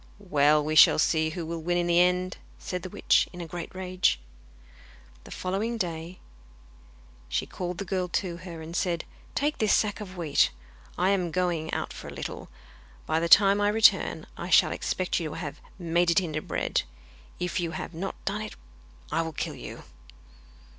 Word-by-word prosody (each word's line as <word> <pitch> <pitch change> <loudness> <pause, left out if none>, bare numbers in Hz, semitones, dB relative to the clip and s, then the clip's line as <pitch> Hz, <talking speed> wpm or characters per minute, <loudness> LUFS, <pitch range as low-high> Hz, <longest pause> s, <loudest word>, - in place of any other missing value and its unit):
'Well, 150 -6 +3
we 155 - -1
shall 155 - +8
see 160 0 +2
who 165 +1 -5
will 165 0 -4
win 175 +2 0
in 175 - +1
the 170 0 +4
end,' 180 +1 +2 0.2
said 180 -1 -5
the 185 - -6
witch, - - +2
in 175 - -10
a 170 - -4
great 175 +2 -7
rage. 185 - +1 1.1
The - - -11
following 205 +6 -2
day 170 -2 -4 1.1
she 65 - 0
called 180 -1 -5
the 200 - -4
girl 185 0 -1
to 175 0 -2
her 170 -2 -8
and 165 +2 -8
said: 175 -2 0 0.3
'Take 295 +1 0
this 215 -2 +3
sack 210 0 0
of 185 -3 -8
wheat. 160 -4 +3 0.5
I 185 - +2
am 185 -3 +1
going 170 -2 -1
out - - -3
for - - -9
a - - -7
little; - - -6 0.6
by 160 - +1
the 170 +1 -1
time 200 +2 +7
I 205 - +3
return 220 +2 +4
I - - -5
shall - - +6
expect 185 0 -1
you 165 -2 -3
to - - -7
have 150 -3 -6 0.2
made 170 -1 +1
it 170 - +5
into 155 -4 -3
bread. - - -1 0.6
If 180 0 -1
you 170 -1 -1
have 175 - -6
not 185 +4 -4
done 205 +2 -1
it 215 - -6 0.6
I 165 +2 +2
will 160 -1 -4
kill - - -3
you. - - -9
175 Hz, 190 wpm, -27 LUFS, 165-185 Hz, 1.1 s, shall